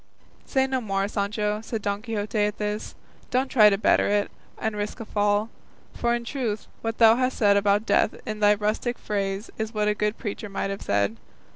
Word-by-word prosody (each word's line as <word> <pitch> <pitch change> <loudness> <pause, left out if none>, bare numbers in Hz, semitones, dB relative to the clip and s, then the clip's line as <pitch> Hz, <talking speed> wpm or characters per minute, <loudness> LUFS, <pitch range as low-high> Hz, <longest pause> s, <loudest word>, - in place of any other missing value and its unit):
"Say 265 -1 +2
no 260 -1 -1
more, 195 -3 -1
Sancho," 210 +1 -1
said 225 -1 -4
Don 200 0 -1
Quixote 215 -2 -3
at 210 0 +1
this; 210 0 -3 0.3
"don't 260 +1 +1
try 215 -4 +7
to 195 - +1
better 215 - +3
it, 205 0 +1 0.3
and 220 -1 -2
risk 205 0 -4
a 225 - -6
fall; 205 +1 +1 0.4
for 235 0 +1
in 235 0 -5
truth 230 -5 -3 0.2
what 225 0 -3
thou 225 0 +7
hast 255 0 0
said 205 -2 +4
about 200 +1 +2
death - - +2
in 215 -1 -4
thy 210 0 +5
rustic 215 +4 -1
phrase 200 0 -3
is 220 +1 -3
what 210 0 +1
a 210 - +3
good 210 +1 -1
preacher 210 -2 -5
might 195 0 -2
have 195 - -5
said. 100 +2 0
210 Hz, 200 wpm, -25 LUFS, 205-225 Hz, 0.4 s, try